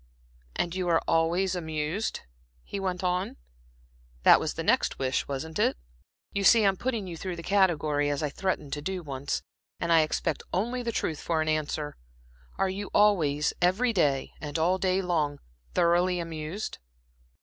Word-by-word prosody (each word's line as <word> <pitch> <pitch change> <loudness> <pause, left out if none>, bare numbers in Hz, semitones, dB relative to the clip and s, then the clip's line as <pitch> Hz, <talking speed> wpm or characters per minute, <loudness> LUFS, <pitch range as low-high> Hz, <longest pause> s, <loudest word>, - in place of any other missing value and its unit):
"And 170 - -1
you 185 -1 -2
are 165 -1 +3
always 175 +3 +2
amused?" 160 +4 -2 0.4
he 200 - -5
went 185 -1 -2
on. 180 +1 -1 0.9
"That - - +8
was - - -3
the - - -3
next - - +2
wish, 130 0 -1
wasn't 145 +3 -4
it? - - +2 0.6
You 200 - -1
see 225 +2 +7
I'm 195 -1 +4
putting 230 -1 -2
you 175 -2 -6
through 180 +2 -4
the 170 - -8
category, 155 -7 +2
as 145 +1 -1
I 150 - -1
threatened 165 -5 -2
to 145 - -3
do 185 +3 -3
once, 140 -1 -3 0.4
and 170 - +1
I 165 - +7
expect 155 - -1
only 240 +7 -1
the 235 -1 -2
truth 160 -8 -2
for 165 -2 0
an 155 - 0
answer. 155 -1 -1 0.6
Are 195 - +2
you 195 +2 -4
always, 160 -9 +3
every 205 +8 +3
day 145 -8 +1
and 150 0 -3
all 175 +4 +2
day 190 0 +1
long, 155 -5 0 0.4
thoroughly 175 +1 +3
amused?" 165 +4 -5
170 Hz, 170 wpm, -28 LUFS, 155-190 Hz, 0.9 s, That